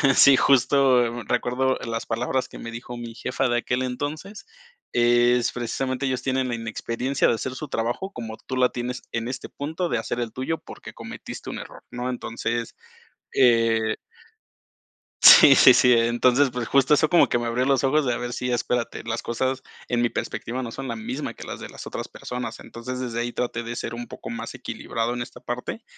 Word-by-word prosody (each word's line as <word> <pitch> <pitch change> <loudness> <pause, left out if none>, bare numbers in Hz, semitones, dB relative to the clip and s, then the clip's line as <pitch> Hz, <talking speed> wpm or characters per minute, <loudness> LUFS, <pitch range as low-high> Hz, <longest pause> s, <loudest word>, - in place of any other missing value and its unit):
sí, 135 -1 +7
justo 130 -3 +3
recuerdo 130 +4 0
las 115 0 -3
palabras 125 +3 -1
que - - -10
me 115 - -6
dijo 120 +1 -7
mi 115 -1 -7
jefa 115 - -1
de 120 - +2
aquel 125 +2 -1
entonces 145 +10 -5 0.5
es, 120 0 +3
precisamente: 130 +2 -2
"Ellos 130 -1 -1
tienen 130 -1 0
la - - -2
inexperiencia 115 +4 -1
de - - +3
hacer 130 +3 -4
su 155 - -6
trabajo 120 - -2
como 110 -2 -7
tú 130 - -4
la 125 -1 +4
tienes 125 +1 -4
en 115 0 -2
este 135 +1 -6
punto 160 +5 -3
de 120 - 0
hacer 120 +2 -3
el 115 -2 -3
tuyo 130 +6 -2
porque - - -11
cometiste - - -8
un - - -5
error", - - -11
¿no? 125 +1 -3
Entonces, 115 -1 -3 0.6
eh 115 -3 +3 1.3
sí, - - +10
sí, - - +8
sí, 125 -1 +5
entonces, 120 +3 +3
pues, 120 -1 -3
justo 140 +2 +4
eso 155 +1 +3
como 175 - +5
que 120 - +1
me 120 - -2
abrió 120 +2 0
los 135 -2 +2
ojos 140 +2 +2
de: 125 - +1
"A - - -2
ver, 120 0 -4
sí, 125 +1 -2
espérate, 120 0 -1
las 115 0 -3
cosas, 130 +3 -2 0.2
en 120 -1 0
mi 120 - +2
perspectiva, 125 +2 -4
no 120 - -5
son 135 +2 -6
la 115 - -3
misma 125 +6 -4
que - - -10
las - - -6
de - - -8
las - - -9
otras - - -5
personas". 125 0 -6
Entonces 125 +2 -7
desde 120 -2 -3
ahí 120 0 -2
traté 120 -1 -2
de 115 +1 -5
ser 115 - -4
un 120 0 -6
poco - - -9
más - - -5
equilibrado 115 +1 -3
en 120 - -4
esta 125 0 -8
parte 125 - -5
125 Hz, 200 wpm, -24 LUFS, 120-130 Hz, 1.3 s, sí